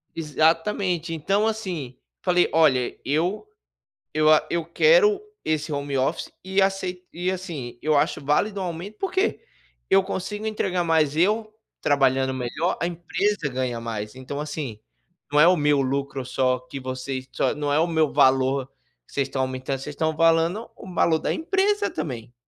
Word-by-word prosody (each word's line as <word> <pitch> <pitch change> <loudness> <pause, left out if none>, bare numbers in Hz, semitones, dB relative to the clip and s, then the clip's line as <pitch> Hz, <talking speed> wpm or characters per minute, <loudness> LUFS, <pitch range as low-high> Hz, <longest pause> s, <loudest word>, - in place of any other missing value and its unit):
Exatamente. 165 +3 +1
Então, 195 +7 +1
assim, 180 - -4 0.2
falei: 180 -1 +3
"Olha, 145 -6 +3
eu 175 - 0 0.7
eu 155 0 +4
a 155 - +5
eu 170 -1 0
quero 420 - +4 0.2
esse 155 0 -1
home 140 -1 -2
office 130 - -1
e 190 +1 +1
acei 185 -2 -1
e, 180 +2 -1
assim, 165 -11 -6
eu 155 -1 +2
acho 145 0 +1
válido 195 +8 +1
um - - -2
aumento, 175 +4 -6
por 390 -3 -2
quê? 385 +3 +1 0.5
Eu 195 0 +6
consigo 205 +3 -4
entregar, 190 -4 0
mas 155 -3 +2
eu 215 +6 +1 0.3
trabalhando 135 -2 +2
melhor, 130 +7 -2
a 170 - +1
empresa 175 0 -1
ganha 125 -2 -2
mais, 105 -2 -5
então 130 +2 -6
assim, 145 -7 -5 0.5
não 145 - +2
é 150 - +8
o 180 - +6
meu 145 -2 +3
lucro 135 0 -2
só 130 0 +1
que 135 +2 -8
vocês 130 0 -5
só - - 0
não 145 0 -2
é 145 - +3
o 165 - +3
meu 160 -3 +1
valor 130 0 +3 0.4
que - - -22
vocês 140 -1 0
estão 135 0 -1
aumentando. 130 +1 -3
Vocês 150 +2 -6
estão 160 +1 -1
falando 165 +7 +2
o 190 - -10
valor 165 -2 +3
da - - -1
empresa 405 +4 +1
também". 120 -4 -5
155 Hz, 170 wpm, -24 LUFS, 135-185 Hz, 0.7 s, é